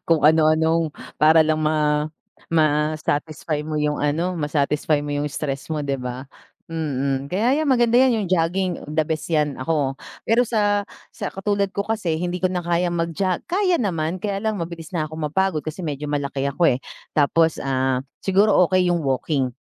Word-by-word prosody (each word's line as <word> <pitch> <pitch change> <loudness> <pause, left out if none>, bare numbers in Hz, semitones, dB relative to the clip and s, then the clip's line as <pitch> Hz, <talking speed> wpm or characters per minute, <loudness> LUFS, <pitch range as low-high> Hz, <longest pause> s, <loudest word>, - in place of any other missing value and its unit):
Kung 160 -3 +3
ano-anong 160 +1 +4 0.3
para 160 +1 +6
lang 155 0 +1
ma 150 -1 +1 0.4
ma-satisfy 155 0 0
mo 155 0 -4
yung 150 0 0
ano, 160 +5 0
ma-satisfy 150 -1 0
mo 145 - -3
yung 145 +1 -1
stress 140 0 -4
mo 150 -2 -2
'di 135 -1 -2
ba? 125 +1 -5 0.5
Mm, 140 -3 -2
kaya 240 +10 +1
'yan 305 - 0
maganda 240 -1 +4
'yan, 235 -6 +3
yung - - -5
jogging, 180 +2 +1 0.2
the 155 +1 +1
best 160 +1 -3
'yan. 150 -4 0
Ako 140 -1 0 0.3
pero 235 +1 +2
sa 205 -2 +2 0.3
sa - - -4
katulad 200 0 -1
ko 200 - 0
kasi 190 -7 -1
hindi 180 +1 -3
ko 185 - +2
na 180 -1 -3
kayang 175 0 0
mag-jo 170 +2 -1
kaya 365 -1 +1
naman! 170 - -1
Kaya 200 +1 -3
lang 220 0 -1
mabilis 170 0 -6
na 155 - 0
akong 155 +1 -7
mapagod 190 -1 0
kasi 155 +4 -6
medyo 150 -1 -4
malaki 140 -1 -1
ako 165 +1 +3
eh, 125 - -1 0.3
tapos 160 +2 +2
ah, 130 -1 0 0.2
siguro 195 0 +4
okay 185 0 +2
yung 170 -3 0
walking. 135 -1 0
160 Hz, 175 wpm, -22 LUFS, 150-185 Hz, 0.5 s, para